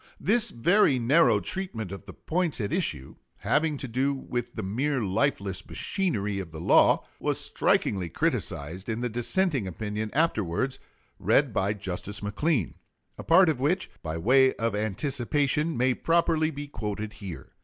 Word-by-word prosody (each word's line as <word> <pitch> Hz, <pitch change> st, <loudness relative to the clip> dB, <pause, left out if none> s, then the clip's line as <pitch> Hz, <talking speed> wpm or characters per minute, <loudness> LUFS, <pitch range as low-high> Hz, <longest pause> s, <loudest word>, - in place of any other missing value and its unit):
This 220 Hz, +3 st, +3 dB
very 150 Hz, -, +3 dB
narrow 120 Hz, -2 st, +4 dB
treatment 115 Hz, -, -4 dB
of 100 Hz, -, -9 dB
the -, -, -9 dB
points 170 Hz, -3 st, -2 dB
at 100 Hz, -3 st, -2 dB
issue, 75 Hz, -, -3 dB, 0.2 s
having 150 Hz, -1 st, 0 dB
to 135 Hz, -, -4 dB
do 130 Hz, +4 st, 0 dB
with 120 Hz, -2 st, -5 dB
the 110 Hz, -, -4 dB
mere 130 Hz, +7 st, -1 dB
lifeless 100 Hz, -2 st, -1 dB
machinery 105 Hz, -, -2 dB
of 95 Hz, -3 st, -6 dB
the 80 Hz, -1 st, -9 dB
law, 85 Hz, -, +4 dB
was -, -, 0 dB
strikingly 95 Hz, -4 st, 0 dB
criticised 85 Hz, +6 st, -2 dB
in 115 Hz, +1 st, -2 dB
the 125 Hz, -, -1 dB
dissenting 125 Hz, -, +1 dB
opinion 105 Hz, +3 st, -4 dB
afterwards 130 Hz, -, 0 dB, 0.4 s
read -, -, +2 dB
by 100 Hz, +2 st, +1 dB
Justice 100 Hz, 0 st, -4 dB
McLean, 110 Hz, -, 0 dB, 0.5 s
a -, -, -6 dB
part 180 Hz, +3 st, +6 dB
of 155 Hz, -5 st, +1 dB
which, 175 Hz, +8 st, 0 dB
by 80 Hz, 0 st, -4 dB
way 130 Hz, +9 st, +4 dB
of 115 Hz, -1 st, -1 dB
anticipation, 140 Hz, -, 0 dB
may 125 Hz, +1 st, +2 dB
properly 165 Hz, +1 st, +1 dB
be 145 Hz, -1 st, -6 dB
quoted 105 Hz, -5 st, -5 dB
here. 95 Hz, -7 st, -9 dB
120 Hz, 155 wpm, -27 LUFS, 100-150 Hz, 0.5 s, part